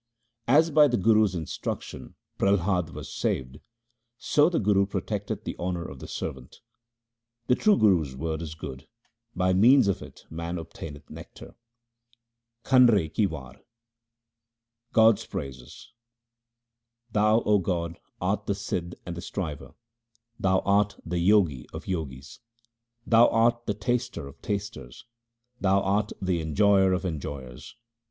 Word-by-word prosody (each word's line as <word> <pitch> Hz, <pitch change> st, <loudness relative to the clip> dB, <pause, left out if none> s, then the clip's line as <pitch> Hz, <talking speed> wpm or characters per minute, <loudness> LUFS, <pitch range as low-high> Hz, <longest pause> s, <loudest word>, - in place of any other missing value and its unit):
As 155 Hz, +6 st, +4 dB
by 150 Hz, 0 st, +6 dB
the 120 Hz, -3 st, 0 dB
guru's 105 Hz, -1 st, +3 dB
instruction 80 Hz, -3 st, -6 dB, 0.2 s
Prahlad 95 Hz, -3 st, +1 dB
was -, -, -8 dB
saved, 65 Hz, +2 st, -2 dB, 0.6 s
so 150 Hz, +6 st, +3 dB
the 175 Hz, -, -1 dB
Guru 100 Hz, -2 st, +2 dB
protecteth 105 Hz, +1 st, -4 dB
the -, -, -5 dB
honour 90 Hz, -1 st, -3 dB
of 70 Hz, -, -9 dB
the -, -, -9 dB
servant. 65 Hz, -1 st, -7 dB, 0.8 s
The 125 Hz, -, +3 dB
true 210 Hz, +9 st, +3 dB
Guru's 85 Hz, -10 st, +2 dB
word 80 Hz, +3 st, -3 dB
is 80 Hz, -1 st, -6 dB
good; 65 Hz, -4 st, -8 dB, 0.5 s
by 95 Hz, 0 st, +2 dB
means 120 Hz, +5 st, +6 dB
of 100 Hz, -, 0 dB
it -, -, -13 dB
man 85 Hz, +2 st, -4 dB
obtaineth 80 Hz, -3 st, -9 dB
nectar. -, -, -11 dB, 1.1 s
Kanre 115 Hz, -, +4 dB
ki 105 Hz, +2 st, +2 dB
War 70 Hz, -6 st, -9 dB, 1.3 s
God's 110 Hz, -1 st, +4 dB
praises: 65 Hz, -, -8 dB, 0.6 s
— 120 Hz, 0 st, -50 dB
Thou 110 Hz, +2 st, +3 dB
O 105 Hz, -2 st, +3 dB
God, 85 Hz, -2 st, -3 dB, 0.2 s
art 100 Hz, +3 st, -1 dB
the 100 Hz, -, 0 dB
Sidh 90 Hz, -3 st, -4 dB
and 90 Hz, -, -5 dB
the 85 Hz, -, -6 dB
Striver; 80 Hz, -7 st, -6 dB, 0.6 s
Thou 95 Hz, -1 st, +2 dB
art 100 Hz, +1 st, +1 dB
the 85 Hz, +1 st, -1 dB
Jogi 90 Hz, -, +3 dB
of -, -, -7 dB
Jogis. 75 Hz, -5 st, -5 dB, 0.7 s
Thou 115 Hz, +1 st, +6 dB
art 120 Hz, +1 st, +2 dB
the 105 Hz, -, 0 dB
Taster 120 Hz, -, -2 dB
of 70 Hz, -, -14 dB
tasters; 100 Hz, -12 st, -5 dB, 0.5 s
Thou 100 Hz, 0 st, +3 dB
art 100 Hz, +2 st, 0 dB
the 90 Hz, -3 st, -1 dB
En 80 Hz, -2 st, -5 dB
j -, -, +3 dB
oyer 100 Hz, -2 st, +5 dB
of 90 Hz, +1 st, 0 dB
enjoyers. 70 Hz, -6 st, -6 dB
95 Hz, 140 wpm, -26 LUFS, 80-110 Hz, 1.3 s, by